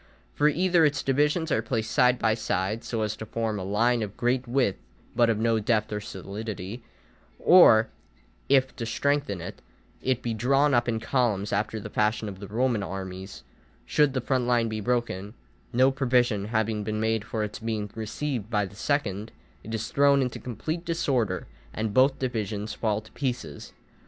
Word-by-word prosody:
For 150 - +3
either 175 +2 +3
its 150 -2 +2
divisions 150 +4 +1
are 110 - +2
placed 115 -1 -2
side 125 0 +4
by 110 - +2
side, 105 0 -2
so 115 -2 -2
as 105 -1 -2
to 110 - -6
form 110 -1 -2
a - - -4
line 115 +5 +2
of 105 -1 -5
great 125 +1 0
width 125 -5 +1 0.4
but 120 0 +4
of 110 - +2
no 115 0 +2
depth 110 0 0
or 105 - -1
solidity; 100 +2 -6 0.6
or 115 -12 +7 0.6
if, 135 -1 +3
to 115 - -3
strengthen 140 -6 0
it, - - -8 0.4
it 130 -2 0
be 120 - -1
drawn 135 +6 +2
up 120 0 +2
in 115 -1 0
columns 110 -6 0
after 105 +2 -1
the 105 0 -8
fashion 105 +1 0
of 95 -2 -7
the 100 - -8
Roman 115 +1 0
armies, 95 0 -6 0.4
should 145 - +2
the 130 - 0
front 130 0 0
line 120 -2 +2
be 110 0 -3
broken, 120 -3 -2 0.4
no 130 +2 +4
provision 125 -6 +1
having 110 -1 -1
been 110 +1 -2
made 110 -1 0
for 110 -1 -3
its 105 - -5
being 110 -2 -2
received 115 +1 -4
by 105 -3 +1
the 95 - -12
second, 110 -5 -1 0.3
it 110 - -8
is 115 0 -3
thrown 140 -1 +4
into 125 - -4
complete 155 +8 -4
disorder, 150 - 0 0.3
and 110 -1 -2
both 130 +4 +4
divisions 110 -4 -3
fall 105 -1 -1
to 110 0 -18
pieces. 125 - -4
115 Hz, 180 wpm, -26 LUFS, 105-130 Hz, 0.6 s, or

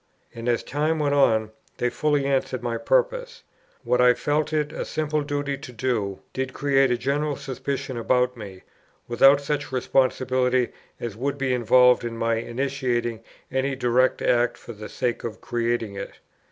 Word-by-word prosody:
And, 115 +1 -4
as 120 - +1
time 155 +3 0
went 145 -2 +1
on, 110 -6 +3 0.3
they 125 0 0
fully 145 +2 +1
answered 130 -3 -1
my 120 -1 -1
purpose. - - 0 0.4
What 125 - +2
I 125 -1 +6
felt 150 +1 0
it 150 -1 0
a - - -3
simple 155 -1 -1
duty 145 -1 -2
to 125 - -9
do, 110 -5 -2
did 130 0 -3
create 135 -2 +3
a 125 - +1
general 145 +4 -1
suspicion 135 0 -4
about 125 +2 +1
me, 100 -5 -10 0.4
without 135 +4 +5
such 145 -1 -3
responsibility 130 -1 +1 0.3
as 115 -4 -5
would 140 +4 -2
be 135 -2 0
involved 125 +1 +5
in 115 -1 -4
my 115 0 +1
initiating 120 -2 -2 0.3
any 135 +1 0
direct 125 0 +2
act 120 0 +2
for 120 - -10
the 105 0 -9
sake 120 -1 -2
of 115 -2 -5
creating 120 -3 -2
it. 100 0 -6
130 Hz, 165 wpm, -24 LUFS, 120-140 Hz, 0.4 s, I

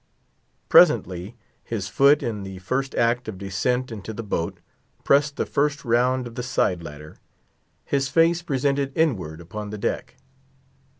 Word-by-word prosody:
Presently, 90 +5 +4 0.3
his 105 -5 -4
foot, 140 +7 +4
in 110 -4 -3
the 95 -1 -7
first 130 +9 -2
act 120 +1 +1
of 105 -4 -5
descent 110 +7 -1
into 110 -1 -6
the 115 - -6
boat, 95 -2 -2 0.5
pressed 140 +1 +3
the - - -1
first 150 0 -1
round 125 +2 +2
of 120 - -8
the 125 - -4
side 110 -8 0
ladder, 75 -1 -10 0.7
his 140 -1 0
face 165 +3 +3
presented 140 -3 -1
inward 95 - 0
upon 105 +5 -7
the 105 - -6
deck. 105 - -3
120 Hz, 145 wpm, -24 LUFS, 95-135 Hz, 0.7 s, Presently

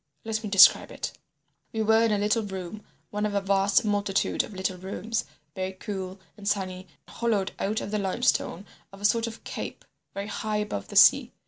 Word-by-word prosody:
Let 220 0 -2
me 210 - -3
describe 195 0 +7
it. - - -4 0.6
We 220 -1 -1
were 220 +1 +4
in 225 - +2
a 210 - +2
little 210 +2 +1
room, 190 0 -6 0.3
one 210 0 -2
of 210 -1 -1
a - - +3
vast 195 +3 +2
multitude 205 -2 +1
of - - -8
little 185 -1 -2
rooms, 200 +4 -3 0.3
very 190 -1 -3
cool 190 -1 -6 0.2
and 205 -2 -9
sunny, 185 -2 -2 0.2
hollowed 215 -5 -1
out 210 +3 -1
of 205 - -5
the 210 - 0
limestone 195 -1 0 0.3
of 195 - -13
a 205 - -3
sort 230 +2 +3
of 230 0 -9
cape, - - -6 0.3
very 200 0 -3
high 210 +1 -3
above 205 - -3
the - - -10
sea. - - +6
205 Hz, 195 wpm, -27 LUFS, 190-215 Hz, 0.6 s, describe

